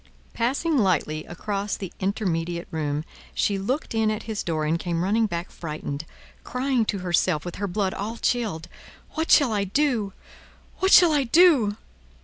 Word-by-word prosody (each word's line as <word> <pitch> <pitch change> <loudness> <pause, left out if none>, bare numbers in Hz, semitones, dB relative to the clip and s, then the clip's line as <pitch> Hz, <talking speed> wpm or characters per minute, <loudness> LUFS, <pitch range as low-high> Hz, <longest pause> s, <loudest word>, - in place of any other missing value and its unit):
Passing 280 +6 +1
lightly 155 -6 +1
across 200 +3 -3
the 190 -4 -7
intermediate 175 -4 -2
room, 150 -1 -2 0.3
she 200 -1 +1
looked 255 +10 -2
in 220 -1 +2
at 215 -1 -2
his 220 -2 -3
door 155 -2 -1
and 160 +2 0
came 170 -1 -1
running 220 +4 +2
back 175 -2 -4
frightened, 150 -2 -5 0.4
crying 255 -2 0
to 210 - -1
herself, 175 -2 +1
with 175 - -6
her 200 - -2
blood 190 0 -1
all 220 +4 -4
chilled, 215 -12 -1 0.4
"What 320 +1 -2
shall 270 -7 +5
I 205 -1 +1
do! 220 -2 0 0.7
What 380 - +2
shall 350 -2 +8
I 290 -3 +2
do!" 265 - +5
200 Hz, 160 wpm, -25 LUFS, 170-235 Hz, 0.7 s, shall